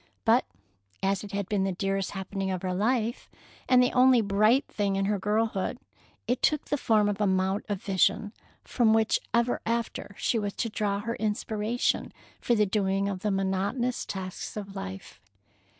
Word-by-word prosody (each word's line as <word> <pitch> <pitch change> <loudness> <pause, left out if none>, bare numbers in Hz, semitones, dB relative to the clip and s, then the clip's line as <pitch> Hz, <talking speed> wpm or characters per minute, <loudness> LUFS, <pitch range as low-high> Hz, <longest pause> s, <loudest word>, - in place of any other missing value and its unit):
But - - +4 0.6
as 195 0 +1
it 205 - -8
had 200 -2 -2
been 200 -2 0
the 190 -1 0
dearest 195 +1 -1
happening 195 0 -3
of 185 -1 -3
her 185 -1 -1
life, 230 +4 0 0.4
and 250 -1 +6
the 250 - +2
only 255 0 +6
bright 215 +5 +3
thing 200 -2 -1
in 195 0 0
her 205 0 0
girlhood, 210 +2 0 0.5
it 245 +2 0
took 300 -1 +2
the 290 - -1
form 215 -5 +3
of 205 0 -2
a 205 - +3
mount 190 +2 0
of 200 -2 -3
vision 200 +2 +1 0.3
from 230 -3 +2
which 220 -1 +2
ever 235 +1 +1
after 230 -3 -3
she 230 - +1
was 205 -1 -3
to 230 - -2
draw 205 -2 -1
her 230 +2 -3
inspiration 215 +2 -1 0.3
for 240 - +1
the 210 -1 +3
doing 195 -1 0
of 190 -2 -3
the 210 - -1
monotonous 195 +6 -1
tasks 190 +1 -6
of 200 -1 -7
life. 195 - -7
205 Hz, 180 wpm, -28 LUFS, 195-225 Hz, 0.6 s, and